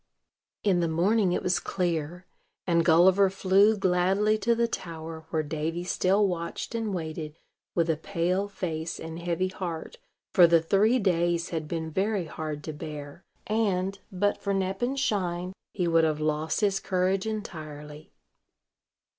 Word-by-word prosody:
In 190 -4 +3
the 170 - +1
morning 185 +5 +2
it - - -1
was 180 -1 +2
clear; 175 -1 -2 0.4
and 170 -2 +3
Gulliver 185 +4 +5
flew 195 +3 +4
gladly 195 +3 +2
to 235 +1 +2
the 235 0 +2
tower 160 -5 -6
where 160 -1 0
Davy 160 +3 -3
still 190 +3 +2
watched 170 +4 -4
and 225 -2 -2
waited, 160 -3 -5 0.4
with 170 -1 +2
a 160 -2 +1
pale 180 +5 -1
face 165 -5 -4
and 160 +1 -7
heavy 175 +2 -1
heart, 175 -4 -6 0.3
for 175 -2 +8
the 170 0 +5
three 200 +9 +3
days 175 -5 +1
had 160 -2 -3
been 160 0 -3
very 195 +1 0
hard 155 -1 -5
to 155 - -5
bear, 150 +2 -8 0.2
and, 200 -3 0
but 200 +2 0
for 200 -1 0
Nep 190 +1 -2
and 265 +3 0
Shine, 180 -6 -1 0.2
he 180 -3 -1
would 165 -1 +4
have 155 -1 +1
lost 155 +3 -1
his 200 -2 +2
courage 190 +1 0
entirely. 155 -8 -7
175 Hz, 155 wpm, -27 LUFS, 160-195 Hz, 0.4 s, for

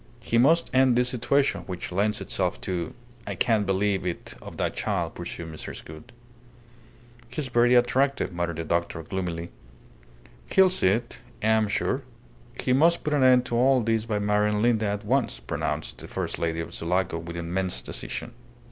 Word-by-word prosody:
"He 115 - +1
must 160 +7 +4
end 130 -1 +5
this 125 0 +3
situation 130 +3 +1
which 90 -1 -5
lends 105 +3 0
itself 60 - -1
to 85 +1 -3 0.3
I - - -3
can't 110 -5 +2
believe 95 0 +1
it 90 -2 -4
of - - -10
that - - -1
child," - - -1
pursued 80 -1 -7
Mrs. 80 - -8
Gould. 80 0 -11 1.2
"He's 130 +2 -3
very 120 +1 +4
attractive," 130 -2 +2
muttered 85 -1 -2
the 85 - -3
doctor, 85 0 -1
gloomily. 85 -1 -4 1.0
"He'll 190 -1 +5
see 185 - +2
it, 115 +5 -1 0.2
I - - +2
am 110 -1 +3
sure. - - 0 0.6
He 125 - +1
must 165 +6 +4
put 150 - -1
an 145 - +2
end 125 -1 +6
to 120 - -2
all 130 +2 +4
this 115 -1 0
by 110 -2 -1
marrying 105 +1 +1
Linda 110 -3 +2
at 105 +1 -3
once," 120 - +1
pronounced - - -3
the - - -8
first - - -4
lady 80 0 -1
of 80 - -7
Sulaco 90 0 -1
with 85 +1 -7
immense 85 -5 -2
decision. - - -5
105 Hz, 175 wpm, -26 LUFS, 85-125 Hz, 1.2 s, end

